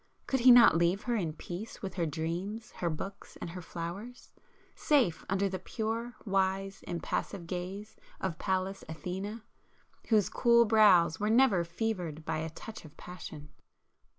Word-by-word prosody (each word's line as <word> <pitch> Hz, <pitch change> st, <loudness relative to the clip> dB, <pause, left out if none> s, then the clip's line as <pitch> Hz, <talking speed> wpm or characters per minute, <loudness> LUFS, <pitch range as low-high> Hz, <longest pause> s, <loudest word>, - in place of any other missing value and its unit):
Could 265 Hz, -, 0 dB
he 250 Hz, +2 st, +6 dB
not 240 Hz, -7 st, +9 dB
leave 170 Hz, +4 st, +2 dB
her 240 Hz, -1 st, 0 dB
in 170 Hz, -8 st, -1 dB
peace 180 Hz, +8 st, -8 dB
with 190 Hz, -2 st, -4 dB
her 170 Hz, -3 st, -1 dB
dreams, 175 Hz, +9 st, -4 dB
her 175 Hz, -, 0 dB
books 190 Hz, +5 st, -7 dB
and 170 Hz, -, -5 dB
her 180 Hz, +1 st, -7 dB
flowers?—safe 200 Hz, -, -3 dB
under 195 Hz, +1 st, +1 dB
the 190 Hz, -1 st, -4 dB
pure, 225 Hz, +4 st, -3 dB
wise, 195 Hz, 0 st, 0 dB
impassive 175 Hz, +1 st, -3 dB
gaze 190 Hz, +5 st, -6 dB, 0.2 s
of 180 Hz, -4 st, -3 dB
Pallas 190 Hz, +1 st, -1 dB
Athene, 190 Hz, +7 st, -5 dB, 0.7 s
whose 210 Hz, -5 st, +4 dB
cool 235 Hz, -1 st, +4 dB
brows 190 Hz, -7 st, +5 dB
were 210 Hz, -, 0 dB
never 225 Hz, -6 st, +4 dB
fevered 170 Hz, -4 st, -3 dB
by -, -, -1 dB
a 160 Hz, +1 st, -3 dB
touch 220 Hz, +7 st, -9 dB
of 155 Hz, -3 st, -14 dB
passion? 155 Hz, -4 st, -9 dB
190 Hz, 150 wpm, -31 LUFS, 170-220 Hz, 0.7 s, not